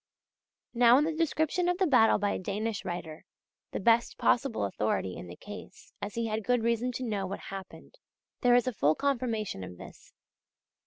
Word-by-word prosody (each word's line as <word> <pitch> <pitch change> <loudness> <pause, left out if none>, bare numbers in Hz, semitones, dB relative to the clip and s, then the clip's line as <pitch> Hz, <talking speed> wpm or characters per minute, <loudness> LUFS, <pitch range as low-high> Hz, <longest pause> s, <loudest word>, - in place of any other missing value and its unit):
Now 240 0 +6
in 290 - +4
the 320 +1 0
description 325 +2 +1
of 360 - +1
the 380 - +2
battle 250 -8 +5
by 205 -1 0
a - - -2
Danish 205 +3 -3
writer 175 -4 -6 0.5
the - - -3
best 230 +3 +3
possible 240 - +1
authority 100 -2 -1
in - - -8
the 85 - -9
case, 205 - -11
as 205 0 -5
he 230 0 -1
had 220 0 -2
good 245 +1 +1
reason 235 +2 +1
to 255 - -4
know 205 -5 -2
what 195 - -5
happened 195 - -10 0.4
there 245 -1 +5
is 245 - +4
a 255 - -1
full 155 -6 +2
confirmation 235 - -1
of 90 -1 -9
this. - - -13
225 Hz, 190 wpm, -29 LUFS, 195-255 Hz, 0.5 s, Now